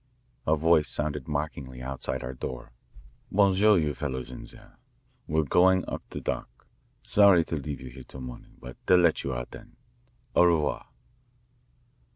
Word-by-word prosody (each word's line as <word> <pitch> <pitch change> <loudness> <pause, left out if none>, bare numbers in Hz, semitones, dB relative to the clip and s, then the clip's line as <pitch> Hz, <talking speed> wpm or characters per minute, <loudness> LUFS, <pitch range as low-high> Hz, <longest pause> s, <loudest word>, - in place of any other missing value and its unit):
A 80 - +4
Voice 80 0 +3
sounded 75 -2 -2
mockingly 70 -4 -4
outside 65 +1 -4
our 65 +1 -5
door. 65 0 -6 0.6
"Bon 100 -1 +4
soir, 105 +2 +5
you 75 -3 +1
fellows 65 -4 -4
in - - -8
there. - - -15 0.5
We're 80 +1 +1
going 90 +5 +3
up - - -4
the - - -6
dock. - - -5 0.4
Sorry 100 -5 +5
to 80 - -3
leave 70 -1 -5
you 65 -1 -9
here - - -11
till 65 - -11
morning, 60 -1 -10
but 60 0 -10
they'll 90 - +7
let 85 -3 +3
you 70 - -2
out - - -5
then. - - -13 0.6
Au 90 - +6
revoir." 80 -4 +1
75 Hz, 165 wpm, -27 LUFS, 65-85 Hz, 0.6 s, they'll